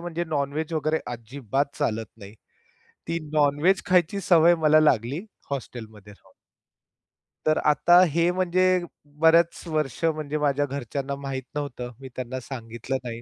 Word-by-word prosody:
म्हणजे 175 0 -4
non 140 -3 -1
veg 155 +2 -3
वगैरे 155 0 0
अजिबात 135 +4 -3
चालत 110 0 -1
नाही. 100 -1 -12 0.7
ती 165 - -1
नॉन 145 -1 +2
व्हेज 190 +3 +3
खायची 180 +2 +2
सवय 170 -2 +5
मला 155 +1 +6
लागली 140 - +1 0.3
हॉस्टेलमध्ये 110 -6 -7
राहून. 95 -2 -23 1.1
तर 155 0 +3
आता 175 +4 +5
हे 170 +1 +3
म्हणजे 185 0 +1 0.6
बऱ्याच 165 +1 +4
वर्ष 155 -3 -2
म्हणजे 155 -2 -1
माझ्या 145 -1 +1
घरच्यांना 140 +1 -4
माहित 135 -1 -5
नव्हतं. 125 -4 -5
मी 135 -1 -9
त्यांना 130 0 -4
सांगितलं 120 0 -5
नाही. 115 -1 -6
145 Hz, 140 wpm, -25 LUFS, 125-160 Hz, 1.1 s, मला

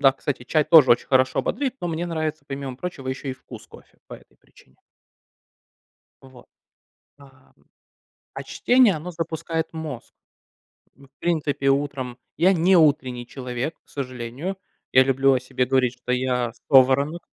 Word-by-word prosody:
Да, 135 -2 +6
кстати, 135 -1 -4
чай 155 +3 +1
тоже 150 -7 +7
очень 120 - +3
хорошо 130 -1 +2
бодрит, 265 +3 -2
но 175 - -3
мне 165 +2 -3
нравится 155 -3 -3
помимо 135 -2 -6
прочего 135 -4 -6
еще 135 +1 -4
и - - -3
вкус - - -13
кофе, - - -18
по - - -9
этой - - -18
причине. 65 - -25 1.5
Вот. 130 -2 -16 0.7
Ам. 135 -2 -20 0.8
А - - -6
чтение, 245 -6 +3
оно 160 +4 -7
запускает 165 -1 -4
мозг. 155 -6 -7 0.8
Ну, 140 - -19
в 140 - -56
принципе, 150 -5 -1
утром 135 -3 -1 0.2
я 180 +5 +4
не 180 +2 +3
утренний 130 -6 +2
человек, 125 +4 -5
к - - -41
сожалению. 130 +6 -5 0.4
Я 130 - +7
люблю 135 +1 +3
о 130 - 0
себе 125 0 -2
говорить, 130 -2 +1
что 125 - -2
я 125 -2 -1 0.2
соворонок. 140 +5 +4
140 Hz, 150 wpm, -23 LUFS, 130-160 Hz, 1.5 s, тоже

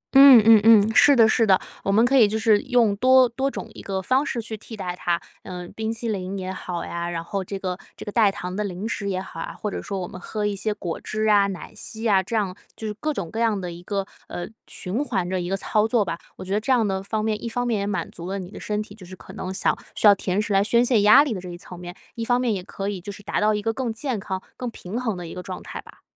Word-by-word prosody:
嗯 270 -2 +10
嗯 225 -1 +8
嗯， 220 -1 +6
是 285 - +7
的 230 -3 +6
是 225 0 +3
的， 190 -1 +5 0.2
我 195 - 0
们 220 +4 +5
可 265 +3 +2
以 225 -5 +7
就 215 +2 -1
是 215 -1 +3
用 240 -5 +2
多 255 +2 +6
多 265 +4 -1
种 - - -6
一 - - -10
个 195 -1 -3
方 260 +9 +2
式 255 - -3
去 220 0 -6
替 220 +1 -10
代 180 -3 -4
它。 175 -1 0 0.2
呃， 180 -1 -7
冰 220 0 -2
淇 230 +1 -5
淋 195 -2 -3
也 185 0 -4
好 175 -2 -5
呀， 170 0 -4
然 165 -1 -3
后 195 +3 -3
这 195 +1 -5
个 185 -1 -4 0.2
这 - - -8
个 205 - -5
代 215 -3 +4
糖 180 -1 -6
的 210 - -1
零 195 +2 -4
食 200 -3 -3
也 185 -1 -1
好 190 -3 -8
啊， - - -5
或 210 - -3
者 - - -4
说 195 -2 -4
我 180 - -4
们 185 - -10
喝 210 -1 -3
一 205 - 0
些 215 +2 -2
果 175 -5 -5
汁 215 0 -2
啊、 200 -1 +5
奶 190 -3 -7
昔 220 0 -8
呀， 200 -4 +4
这 225 +5 -5
样， 195 -4 0 0.2
就 220 - -7
是 210 - -2
各 305 +9 -2
种 185 - -4
各 225 - -4
样 225 -4 +2
的 180 -2 -5
一 170 +1 -9
个， 195 +1 -2 0.2
呃， 175 - -5 0.2
循 200 +10 -3
环 185 -11 -1
的 185 0 -1
一 175 - -4
个 195 - 0
操 215 +2 +1
作 225 -3 +2
吧。 170 -2 -4 0.2
我 185 - -9
觉 190 - -3
得 210 - +2
这 265 - -1
样 230 -4 +3
的 190 -1 -1
方 215 +2 -2
面， 215 -1 -1
一 235 - -3
方 245 +1 -2
面 230 -4 0
也 200 - -2
满 205 - -3
足 170 0 -8
了 195 - -2
你 185 -1 -7
的 - - -9
身 210 0 -2
体 210 - -12
就 205 -2 -14
是 185 - -9
可 - - -13
能 185 - -5
想 190 - +1 0.2
需 - - -1
要 205 - +10
甜 190 -1 -1
食 210 -1 -1
来 195 0 +4
宣 235 +3 +3
泄 235 -4 +3
压 215 +8 +8
力 270 -7 -2
的 185 - -5
这 180 - -8
一 175 - -7
层 180 0 -11
面， 180 0 -8 0.2
一 230 - -4
方 245 +1 +2
面 245 -3 +1
也 190 - -3
可 195 +1 -5
以 200 -3 -3
就 205 +3 -7
是 200 0 -11
达 - - -1
到 215 0 +3
一 210 - -3
个 225 +1 0
更 255 -2 -2
健 225 0 -3
康、 190 -1 -5
更 250 -1 -3
平 220 +1 -6
衡 220 -6 -2
的 175 - -6
一 - - -8
个 180 - -6
状 185 0 -7
态 - - -7
吧。 - - -17
205 Hz, 325 characters per minute, -24 LUFS, 185-225 Hz, 0.2 s, 嗯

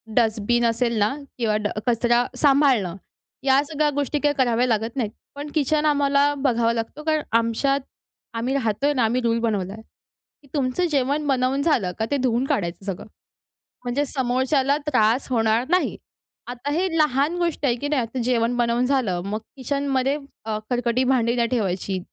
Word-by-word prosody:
Dustbin 235 +1 +2
असेल 235 0 +1
ना 210 +5 +2 0.2
किंवा 220 -3 0
ड - - +2 0.2
कचरा 240 +1 +2
सांभाळणं, 270 - +3 0.5
या 270 0 +4
सगळ्या 300 -1 +1
गोष्टी, 290 +1 -1
काही 290 0 +2
कराव्या 245 -1 +2
लागत 225 +2 -1
नाहीत. 225 -5 -1 0.2
पण 290 +1 -6
किचन 305 +1 +1
आम्हाला 285 -1 +3
बघावं 235 -4 +1
लागतो, 235 +6 -5
कारण 310 -1 +1 0.2
आमच्यात 275 +5 0 0.6
आम्ही 250 +4 -1
राहतोय 275 +3 0
ना, 250 -4 +1
आम्ही 240 +3 +1
रूल 230 -1 +1
बनवला 205 -4 -1
आहे, 220 - -10 0.6
की 280 - -21
तुमचं 280 +5 0
जेवण 285 +2 0
बनवून 265 +1 +1
झालं 240 - +1
का, 220 - +1
ते 285 - +2
धुवून 250 0 +1
काढायचं 175 -4 -2
सगळं, 195 0 -5 0.8
म्हणजे 260 +4 0
समोरच्याला 260 +2 +1
त्रास 245 -2 +2
होणार 225 0 +2
नाही. 365 +1 +1 0.5
आता 250 +4 -5
हे 360 +4 +1
लहान 300 +3 +2
गोष्ट 340 -4 -1
आहे, 240 -3 +3
की 285 +4 -4
नाही, 285 -5 +1
आता 230 +3 -5
जेवण 240 -1 +1
बनवून 240 +1 +1
झालं, 235 -10 0
मग 210 +2 -2 0.2
किचनमध्ये 275 +1 0 0.3
अ, 215 -1 -2
खरकटी 245 +1 +1
भांडी 245 -2 +2
नाही 235 -1 +1
ठेवायची. 195 -5 -1
250 Hz, 165 wpm, -23 LUFS, 230-280 Hz, 0.8 s, या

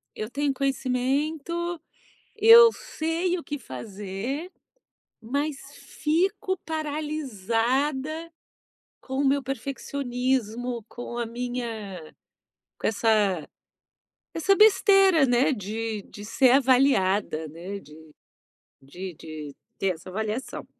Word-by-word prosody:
eu 215 - -4
tenho 285 +2 0
conhecimento, 280 +6 -1 0.6
eu 460 +2 +9
sei 335 +3 -2
o - - -10
que 290 -1 -5
fazer, 205 - -6 0.7
mas 280 +5 -2 0.2
fico 370 +7 -1
paralisada 295 - -1 0.7
com 265 - -6
o 285 - +2
meu 280 +1 +2
perfeccionismo, 250 -3 -2
com 240 0 -7
a 235 - 0
minha 230 -7 -5 0.7
com - - -2
essa 205 -6 +1 0.9
essa 370 +4 +3
besteira, 390 -6 +6
né, 245 +3 +3
de 220 -1 -4
de 205 - -11
ser 255 +4 +3
avaliada, 225 - +3
né, 180 +6 -7
de 150 +1 -16 0.7
de 175 +6 -8
de 150 -3 -9 0.2
ter 195 - -1
essa 160 - -15
avaliação. 215 +5 -4
255 Hz, 100 wpm, -26 LUFS, 210-300 Hz, 0.9 s, eu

